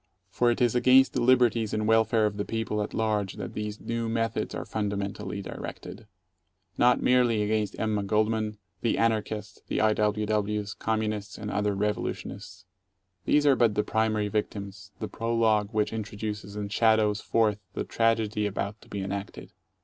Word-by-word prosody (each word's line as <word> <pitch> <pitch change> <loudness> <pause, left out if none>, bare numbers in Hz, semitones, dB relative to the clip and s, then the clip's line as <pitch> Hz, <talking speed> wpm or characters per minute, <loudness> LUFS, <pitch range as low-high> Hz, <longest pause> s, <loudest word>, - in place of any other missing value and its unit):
For 120 +4 +2
it 120 - 0
is 120 -2 +3
against 130 +2 +5
the - - 0
liberties 120 -3 +3
and 110 0 -1
welfare 110 0 +4
of 105 -1 -1
the 100 - -1
people 110 -1 -2
at 105 - -4
large 105 -3 0
that 100 -3 -6
these 105 0 -4
new 115 0 -3
methods 115 0 -1
are - - -4
fundamentally 100 -1 -3
directed. 105 - -8 0.7
Not 125 0 +3
merely 120 -4 +3
against 105 -1 -1
Emma 110 -2 0
Goldman, 110 +1 0 0.2
the 115 - +1
Anarchists, 110 -2 -1
the - - -1
I. 110 0 +4
W. 105 0 0
Ws., 105 0 -1
Communists, 110 -2 -2
and 105 0 -5
other 105 0 0
revolutionists. 105 -3 -4 0.6
These 150 0 +3
are 140 -2 +6
but 115 -4 +3
the 105 - +2
primary 110 -1 0
victims, 100 -2 -4
the 110 - -4
prologue 115 -3 +1
which 105 -1 0
introduces 105 -2 -5
and 100 -1 -4
shadows 110 -2 +3
forth 110 -3 +1 0.2
the - - -1
tragedy 110 -2 +1
about 105 +1 -4
to - - -18
be 100 - -4
enacted. 100 +1 -6
110 Hz, 165 wpm, -27 LUFS, 105-115 Hz, 0.7 s, are